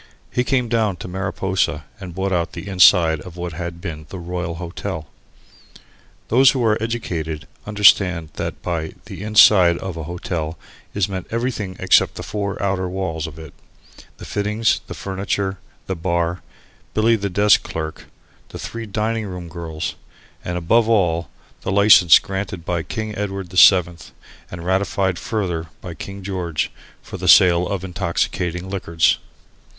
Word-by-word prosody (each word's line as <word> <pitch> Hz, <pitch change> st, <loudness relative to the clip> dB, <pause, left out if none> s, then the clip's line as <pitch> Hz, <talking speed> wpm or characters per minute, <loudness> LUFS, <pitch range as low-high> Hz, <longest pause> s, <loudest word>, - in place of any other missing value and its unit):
He 125 Hz, -, +1 dB
came 125 Hz, -2 st, +1 dB
down 110 Hz, -4 st, +1 dB
to 90 Hz, -, -8 dB
Mariposa 95 Hz, -4 st, -1 dB
and 90 Hz, -4 st, -8 dB
bought 95 Hz, +1 st, -1 dB
out 85 Hz, -2 st, -1 dB
the 85 Hz, +3 st, -7 dB
"inside" 90 Hz, -4 st, +5 dB
of 90 Hz, -1 st, -11 dB
what 85 Hz, -1 st, -4 dB
had 85 Hz, +1 st, -6 dB
been 75 Hz, -3 st, -7 dB
the 95 Hz, -, -7 dB
Royal 90 Hz, -1 st, -4 dB
Hotel. 85 Hz, -1 st, -5 dB, 1.2 s
Those 130 Hz, +3 st, +6 dB
who 125 Hz, -3 st, +1 dB
are 110 Hz, -1 st, +4 dB
educated 85 Hz, -10 st, -3 dB, 0.2 s
understand 95 Hz, -5 st, +4 dB
that -, -, -5 dB
by 80 Hz, -3 st, -3 dB
the -, -, -9 dB
"inside" 100 Hz, -4 st, +6 dB
of 95 Hz, -2 st, -6 dB
a 80 Hz, -, -5 dB
hotel 85 Hz, -1 st, -4 dB, 0.4 s
is 100 Hz, -2 st, +1 dB
meant 95 Hz, -2 st, -5 dB
everything 115 Hz, -5 st, -2 dB
except -, -, +3 dB
the -, -, -6 dB
four 100 Hz, -1 st, -3 dB
outer 95 Hz, -2 st, 0 dB
walls 85 Hz, -4 st, -3 dB
of 80 Hz, -1 st, -10 dB
it 80 Hz, -1 st, -10 dB, 0.6 s
the -, -, -10 dB
fittings, 105 Hz, +2 st, 0 dB
the -, -, -7 dB
furniture, 95 Hz, 0 st, -3 dB, 0.3 s
the 95 Hz, -, -3 dB
bar, 85 Hz, 0 st, -1 dB, 0.5 s
Billy 115 Hz, +2 st, +4 dB
the 100 Hz, -2 st, -2 dB
desk 100 Hz, +3 st, +4 dB
clerk, 80 Hz, -1 st, -6 dB, 0.4 s
the -, -, -8 dB
three 115 Hz, -1 st, -6 dB
dining 110 Hz, +1 st, -2 dB
room 90 Hz, -2 st, -7 dB
girls, 80 Hz, -2 st, -5 dB, 0.5 s
and 90 Hz, 0 st, -3 dB
above 110 Hz, +7 st, +2 dB
all 85 Hz, -7 st, +2 dB, 0.3 s
the -, -, -3 dB
license 100 Hz, -4 st, +7 dB
granted 95 Hz, -3 st, -5 dB
by 85 Hz, -2 st, -1 dB
King 110 Hz, +5 st, -5 dB
Edward 95 Hz, -3 st, -4 dB
VII., 90 Hz, -2 st, +6 dB, 0.5 s
and 85 Hz, -1 st, -8 dB
ratified 95 Hz, -1 st, 0 dB
further 90 Hz, -8 st, -2 dB
by 90 Hz, -2 st, -8 dB
King 95 Hz, +5 st, -8 dB
George, 90 Hz, -5 st, -2 dB, 0.3 s
for -, -, -8 dB
the -, -, -4 dB
sale 90 Hz, -1 st, +6 dB
of 100 Hz, -2 st, -3 dB
intoxicating 90 Hz, 0 st, -2 dB
liquors. 85 Hz, -5 st, +1 dB
95 Hz, 155 wpm, -21 LUFS, 85-100 Hz, 1.2 s, license